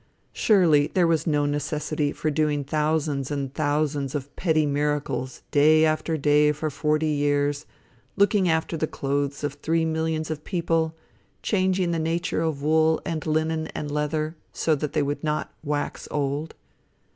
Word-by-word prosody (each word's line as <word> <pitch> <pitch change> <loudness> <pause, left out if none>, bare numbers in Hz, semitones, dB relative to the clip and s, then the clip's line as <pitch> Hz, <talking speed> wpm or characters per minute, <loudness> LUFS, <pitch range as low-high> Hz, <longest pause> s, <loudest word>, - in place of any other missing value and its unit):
Surely 165 -9 +4
there 180 -2 +4
was 165 0 +1
no 145 -2 +2
necessity 150 0 -1
for 155 - -2
doing 150 -1 +1
thousands 150 -2 0
and 140 -2 -3
thousands 145 -2 -1
of 140 0 -5
petty 155 -3 +2
miracles, 145 -3 -2
day 155 +2 +5
after 155 +1 0
day 150 +1 +4
for 150 +1 -3
forty 155 +2 0
years, 145 -1 0 0.5
looking 200 -2 +3
after 160 +1 0
the 155 0 -1
clothes 140 0 -2
of 145 -1 -1
three 160 +3 0
millions 160 0 -1
of 150 -1 -5
people, 165 -3 0 0.5
changing 185 -3 +1
the 165 - 0
nature 165 +1 -1
of 155 -4 -2
wool, 160 +1 +3
and 160 -1 -3
linen, 160 +1 0
and 145 -1 -4
leather, 155 +2 -1 0.2
so 160 - +1
that 150 0 -2
they 150 - +2
would 145 +2 -3
not 150 0 -2
"wax 145 -1 -3
old." 145 +2 -2
155 Hz, 155 wpm, -25 LUFS, 145-160 Hz, 0.5 s, day